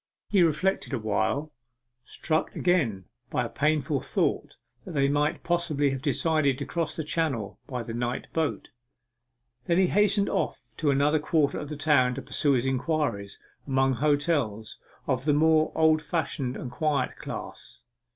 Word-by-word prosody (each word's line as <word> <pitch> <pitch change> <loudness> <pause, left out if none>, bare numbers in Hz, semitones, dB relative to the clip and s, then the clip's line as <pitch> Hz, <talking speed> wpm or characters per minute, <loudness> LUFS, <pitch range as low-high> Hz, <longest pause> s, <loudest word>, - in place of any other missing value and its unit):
He 195 - +4
reflected 170 0 +1
awhile, 110 +5 -1 0.5
struck 155 +4 -2
again 135 - +1 0.2
by - - 0
a - - -5
painful 150 -2 0
thought - - -1 0.3
that 180 - -8
they 140 -1 +3
might 150 +3 0
possibly 165 -5 +1
have 135 -1 -4
decided 150 -1 +2
to 140 - -4
cross 165 -2 -2
the 160 - -3
Channel 135 - -2
by 125 -3 -4
the 115 0 -6
night 120 +1 -2
boat. 160 -2 -1 1.0
Then 170 - +2
he 190 - +5
hastened 200 +1 +3
off - - -2
to 155 - +1
another 145 +3 +3
quarter 150 -1 +1
of 145 - -6
the 150 - -5
town 140 -4 +3
to 135 - -5
pursue 140 +2 +1
his 125 -1 +1
inquiries 130 -6 -1 0.3
among 135 -1 +2
hotels 140 -6 0 0.3
of 130 -1 -1
the 150 - +3
more 155 +1 +3
old 160 -1 +4
fashioned 150 -5 -2
and 125 - -6
quiet 145 0 0
class. - - -8
145 Hz, 155 wpm, -27 LUFS, 130-160 Hz, 1.0 s, he